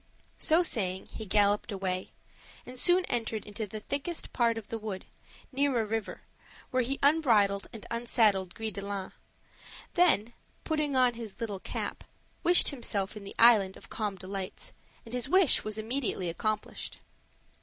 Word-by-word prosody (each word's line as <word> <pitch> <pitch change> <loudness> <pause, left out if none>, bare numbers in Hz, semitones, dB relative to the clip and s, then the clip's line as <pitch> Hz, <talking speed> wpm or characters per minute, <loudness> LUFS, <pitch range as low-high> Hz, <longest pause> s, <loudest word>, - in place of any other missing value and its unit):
So 335 +1 +4
saying, 190 - -1
he 220 - -6
galloped 205 +3 +2
away 185 -2 -2 0.6
and 250 0 -7
soon 360 +4 +5
entered 225 -2 -2
into 210 +1 -5
the 215 +2 -6
thickest 285 +8 -4
part 235 -2 +2
of 215 -2 -7
the 225 - -3
wood, 210 -3 -5 0.5
near 275 -2 +1
a 220 - +1
river, 220 0 -3 0.5
where 255 -1 +2
he 265 +3 -1
unbridled 225 -10 +3
and 225 - -9
unsaddled 220 -5 +2
Gris 220 -1 -3
de 200 - -5
line; 200 -1 -4 0.8
then, 240 - +3 0.3
putting 305 -3 -1
on 250 -1 +4
his 225 -3 -8
little 210 -4 -3
cap, - - -5 0.4
wished 350 +1 +6
himself 220 -8 -2
in 210 -2 -8
the 195 - -8
Island 215 -5 +6
of - - -15
Calm 210 -3 -2
Delights, 190 0 -6 0.3
and 230 - -8
his 250 +1 -1
wish 370 -4 +5
was 215 0 -3
immediately 220 -5 -2
accomplished. 215 +5 -3
225 Hz, 155 wpm, -30 LUFS, 200-255 Hz, 0.8 s, wished